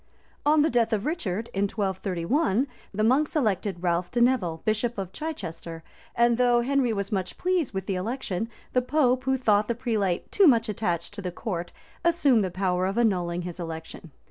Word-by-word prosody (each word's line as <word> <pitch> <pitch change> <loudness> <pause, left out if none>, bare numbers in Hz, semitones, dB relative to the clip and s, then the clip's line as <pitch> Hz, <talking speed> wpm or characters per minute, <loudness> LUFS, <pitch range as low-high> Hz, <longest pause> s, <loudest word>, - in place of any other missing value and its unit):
On 300 0 +5
the 315 - +3
death 235 -1 +2
of 210 -1 0
Richard, 230 - -2
in 195 +1 +1
1231, 195 - 0 0.3
the 215 +2 -1
monks 270 +8 +2
elected 200 - 0
Ralph 175 0 0
de 240 - -1
Neville, 215 -10 +2
bishop 225 +2 0
of 190 -2 -4
Chichester; 170 - -6 0.3
and 235 0 +3
though 245 -1 +4
Henry 265 -1 +1
was 200 -2 -3
much 190 -3 -2
pleased 360 -6 0
with 190 -1 -4
the 195 - -1
election, 225 0 -3 0.2
the 250 - +3
pope, 255 -1 +1
who 265 0 +2
thought 210 -4 +2
that 235 - -2
prelate 215 -8 -1
too 395 -3 +5
much 230 -4 +4
attached 185 -5 -2
to 205 - -6
the 180 -2 -4
crown, 175 -2 -4 0.4
assumed 285 -10 +4
the 190 - -1
power 185 0 0
of 195 +3 -3
annulling 180 -6 +1
his 175 0 -7
election. 165 0 -7
215 Hz, 185 wpm, -26 LUFS, 185-250 Hz, 0.4 s, On